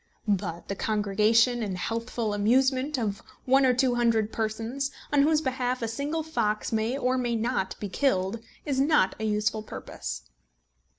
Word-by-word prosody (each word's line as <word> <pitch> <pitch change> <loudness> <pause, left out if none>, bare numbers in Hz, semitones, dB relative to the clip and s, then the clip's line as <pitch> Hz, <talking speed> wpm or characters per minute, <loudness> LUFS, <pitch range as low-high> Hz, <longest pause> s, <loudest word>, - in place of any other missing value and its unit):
But 185 -4 -1
the - - -2
congregation 215 +4 +2
and 195 -4 -3
healthful 230 +1 -2
amusement 260 +7 +2
of 210 -5 -2 0.2
one 265 +1 +5
or 250 - +4
two 255 0 +2
hundred 230 -3 +1
persons, 225 +5 -2 0.2
on 285 - +5
whose 305 +1 +3
behalf 255 -3 -1
a - - 0
single 290 +8 -2
fox 215 -10 -1
may 225 +4 0
or 255 -1 +1
may 240 -1 0
not 225 -4 -1
be 205 - -3
killed, 195 -2 0 0.3
is 275 -3 0
not 275 -9 +3
a 220 - -2
useful 210 0 0
purpose. 65 - -7
230 Hz, 160 wpm, -27 LUFS, 210-260 Hz, 0.3 s, one